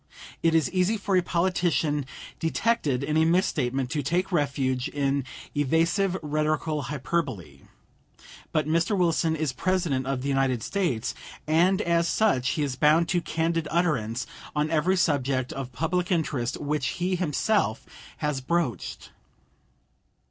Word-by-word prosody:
It 165 Hz, -1 st, +3 dB
is 160 Hz, -5 st, +3 dB
easy 185 Hz, +4 st, +2 dB
for 200 Hz, -1 st, -1 dB
a 185 Hz, -, +5 dB
politician 170 Hz, -5 st, 0 dB, 0.3 s
detected 160 Hz, -, 0 dB
in 150 Hz, +2 st, 0 dB
a 160 Hz, -, +5 dB
misstatement 135 Hz, -7 st, +1 dB
to 150 Hz, -, 0 dB
take 175 Hz, +7 st, -1 dB
refuge 140 Hz, -5 st, 0 dB
in 140 Hz, -2 st, 0 dB, 0.3 s
evasive 165 Hz, +6 st, +1 dB
rhetorical 155 Hz, 0 st, 0 dB
hyperbole. 140 Hz, -, -3 dB, 0.9 s
But 155 Hz, -, +1 dB
Mr. 170 Hz, +6 st, +1 dB
Wilson 165 Hz, -2 st, +2 dB
is 155 Hz, -4 st, -1 dB
President 160 Hz, -4 st, 0 dB
of 135 Hz, -2 st, -2 dB
the -, -, -2 dB
United 135 Hz, -4 st, +1 dB
States, 165 Hz, -, -1 dB, 0.3 s
and 180 Hz, +6 st, +3 dB
as 170 Hz, 0 st, +2 dB
such 150 Hz, -, +2 dB
he 150 Hz, -, -1 dB
is 135 Hz, -3 st, -2 dB
bound 155 Hz, +4 st, +4 dB
to 175 Hz, -, +1 dB
candid 165 Hz, -1 st, -1 dB
utterance 130 Hz, -9 st, 0 dB, 0.3 s
on 150 Hz, +1 st, 0 dB
every 170 Hz, +4 st, +2 dB
subject 135 Hz, -6 st, +1 dB
of 135 Hz, -2 st, -5 dB
public 175 Hz, +8 st, -1 dB
interest 145 Hz, -8 st, -1 dB
which 145 Hz, -2 st, -1 dB
he 185 Hz, +1 st, 0 dB
himself 180 Hz, -, 0 dB, 0.3 s
has 150 Hz, -3 st, -2 dB
broached. 130 Hz, -, -2 dB
155 Hz, 135 wpm, -26 LUFS, 135-175 Hz, 0.9 s, a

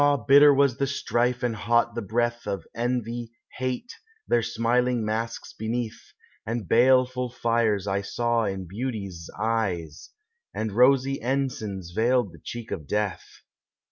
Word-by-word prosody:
bitter 145 Hz, +1 st, +8 dB
was 140 Hz, -3 st, +3 dB
the 140 Hz, -, 0 dB
strife, 125 Hz, -2 st, 0 dB
and 120 Hz, -2 st, 0 dB
hot 115 Hz, +3 st, +1 dB
the 115 Hz, -, -3 dB
breath, 120 Hz, +2 st, -1 dB
Of 100 Hz, -5 st, -3 dB
envy, 120 Hz, 0 st, -2 dB, 0.2 s
hate, 130 Hz, -, -3 dB, 0.3 s
their 120 Hz, -, +3 dB
smiling 120 Hz, +1 st, +1 dB
masks 115 Hz, +2 st, -3 dB
beneath, 115 Hz, +1 st, -4 dB, 0.3 s
And 115 Hz, -3 st, -3 dB
baleful 125 Hz, +2 st, +3 dB
fires 115 Hz, -4 st, +1 dB
I 100 Hz, 0 st, 0 dB
saw 120 Hz, +2 st, 0 dB
in 95 Hz, -2 st, -3 dB
beauties' 100 Hz, -5 st, -5 dB
eyes, 95 Hz, -8 st, -2 dB, 0.5 s
And 110 Hz, -1 st, -2 dB
rosy 135 Hz, +4 st, +3 dB
ensigns 120 Hz, -8 st, -2 dB
veiled 115 Hz, +1 st, +2 dB
the -, -, -15 dB
cheek 120 Hz, -1 st, -7 dB
of 75 Hz, -, -5 dB
death. 105 Hz, -2 st, -1 dB
115 Hz, 135 wpm, -26 LUFS, 105-125 Hz, 0.5 s, bitter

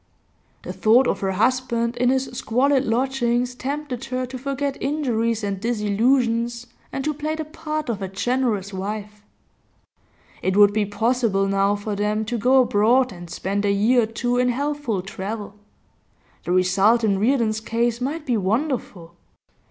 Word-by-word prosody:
The -, -, -6 dB
thought 235 Hz, +5 st, +4 dB
of -, -, 0 dB
her 190 Hz, -1 st, -1 dB
husband 235 Hz, +2 st, 0 dB
in 245 Hz, 0 st, +2 dB
his 265 Hz, 0 st, +1 dB
squalid 265 Hz, +4 st, +1 dB
lodgings 245 Hz, 0 st, 0 dB
tempted 270 Hz, 0 st, -4 dB
her 255 Hz, +1 st, -2 dB
to 255 Hz, +1 st, -7 dB
forget 275 Hz, +1 st, -3 dB
injuries 230 Hz, -6 st, 0 dB
and 200 Hz, -1 st, -2 dB
disillusions, 235 Hz, +2 st, +1 dB, 0.3 s
and 270 Hz, -, -3 dB
to 305 Hz, -, 0 dB
play 305 Hz, +2 st, -3 dB
the 315 Hz, 0 st, -4 dB
part 310 Hz, -1 st, -4 dB
of 220 Hz, -4 st, -3 dB
a 190 Hz, -, -2 dB
generous 210 Hz, -1 st, -1 dB
wife. 210 Hz, +2 st, -5 dB, 1.2 s
It 190 Hz, +1 st, 0 dB
would 205 Hz, -1 st, +6 dB
be 210 Hz, -1 st, 0 dB
possible 215 Hz, -1 st, +1 dB
now 195 Hz, +1 st, +2 dB
for 205 Hz, 0 st, -4 dB
them 210 Hz, +1 st, -1 dB
to 235 Hz, +1 st, -3 dB
go 255 Hz, +3 st, +5 dB
abroad 240 Hz, +4 st, +3 dB
and 175 Hz, -2 st, -10 dB
spend 200 Hz, +4 st, -2 dB
a 200 Hz, -, +2 dB
year 225 Hz, +5 st, +3 dB
or -, -, +1 dB
two 245 Hz, +2 st, -1 dB
in 250 Hz, 0 st, +2 dB
healthful 275 Hz, -6 st, -2 dB
travel; 205 Hz, +1 st, -6 dB, 0.9 s
the -, -, -2 dB
result 195 Hz, +5 st, +3 dB
in 200 Hz, -3 st, +2 dB
Reardon's 225 Hz, -1 st, +1 dB
case 235 Hz, +1 st, -1 dB
might 295 Hz, +5 st, -3 dB
be 245 Hz, -3 st, +1 dB
wonderful. 205 Hz, -, -2 dB
235 Hz, 160 wpm, -22 LUFS, 205-255 Hz, 1.2 s, would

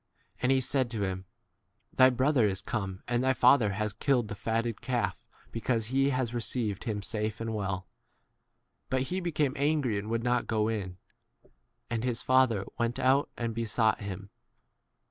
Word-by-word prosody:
And 125 Hz, +1 st, +3 dB
he 135 Hz, -1 st, +3 dB
said 130 Hz, -1 st, +1 dB
to 110 Hz, -3 st, -2 dB
him, 95 Hz, -1 st, -3 dB, 0.7 s
Thy 130 Hz, 0 st, +7 dB
brother 130 Hz, -2 st, +3 dB
is 95 Hz, -2 st, -2 dB
come, 100 Hz, -5 st, -4 dB
and 120 Hz, +1 st, +1 dB
thy 130 Hz, 0 st, +3 dB
father 125 Hz, -4 st, +5 dB
has 105 Hz, 0 st, -2 dB
killed 120 Hz, 0 st, +1 dB
the -, -, -3 dB
fat 115 Hz, +3 st, -1 dB
ted 115 Hz, -2 st, -4 dB
calf 115 Hz, -8 st, -2 dB, 0.3 s
because 115 Hz, -1 st, -1 dB
he 135 Hz, +1 st, +3 dB
has 130 Hz, -3 st, -1 dB
received 115 Hz, -4 st, -1 dB
28 115 Hz, -, -2 dB
him 105 Hz, -1 st, -4 dB
safe 110 Hz, 0 st, -2 dB
and 115 Hz, 0 st, -3 dB
well. 95 Hz, -2 st, -2 dB, 1.0 s
But 130 Hz, 0 st, +1 dB
he 185 Hz, -, 0 dB
became 155 Hz, -6 st, 0 dB
angry 140 Hz, -7 st, +1 dB
and 105 Hz, +2 st, -6 dB
would 115 Hz, 0 st, -1 dB
not 125 Hz, 0 st, +1 dB
go 110 Hz, -1 st, +1 dB
in. 95 Hz, -5 st, -3 dB, 0.9 s
And 115 Hz, -1 st, 0 dB
r 125 Hz, -, -2 dB
his 120 Hz, -2 st, 0 dB
father 130 Hz, -6 st, +3 dB
went 120 Hz, 0 st, 0 dB
out 135 Hz, +2 st, +3 dB
and 115 Hz, -1 st, -2 dB
besought 110 Hz, -1 st, +1 dB
29 100 Hz, -, -5 dB
him. 100 Hz, 0 st, -13 dB
115 Hz, 185 wpm, -29 LUFS, 105-130 Hz, 1.0 s, Thy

